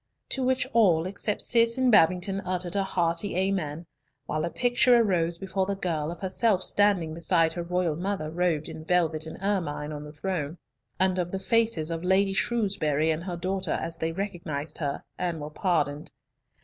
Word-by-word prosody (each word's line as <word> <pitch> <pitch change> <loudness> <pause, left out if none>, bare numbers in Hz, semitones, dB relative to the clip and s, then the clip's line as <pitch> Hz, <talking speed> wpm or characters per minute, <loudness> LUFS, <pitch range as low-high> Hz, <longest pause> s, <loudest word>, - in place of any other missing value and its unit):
To 265 - -2
which 255 0 +1
all 180 -8 +4
except 200 +2 -1
Cis 230 0 +4
and 260 -1 +3
Babington 190 0 +3
uttered 180 -1 -2
a 200 - +2
hearty 175 0 0
amen, 180 -4 -1 0.4
while 155 +1 -2
a - - -2
picture 245 +3 +3
arose 175 -6 +1
before 190 +1 -2
the 200 - -1
girl 165 -5 -2
of 175 - -9
herself 190 0 +1
standing 195 -6 +2
beside 165 -1 +2
her 175 - -4
royal 175 -2 -1
mother 180 -3 -3
robed 165 -3 0
in 155 - -8
velvet 160 -2 +1
and 160 - -8
ermine 165 -7 -1
on 150 -1 -6
the 150 - -9
throne, 155 0 -3 0.4
and 185 0 +2
of 175 0 -2
the 195 - -2
faces 220 -6 +1
of 165 0 -4
Lady 195 +2 +3
Shrewsbury 190 -9 +1
and 160 +2 -3
her 175 -2 -4
daughter 185 0 -1
as 165 0 -4
they 160 0 -2
recognised 165 -5 -5
her, 140 -3 -3 0.2
and 175 -3 -2
were 150 +1 -6
pardoned. 150 -4 -1
180 Hz, 180 wpm, -27 LUFS, 160-195 Hz, 0.4 s, all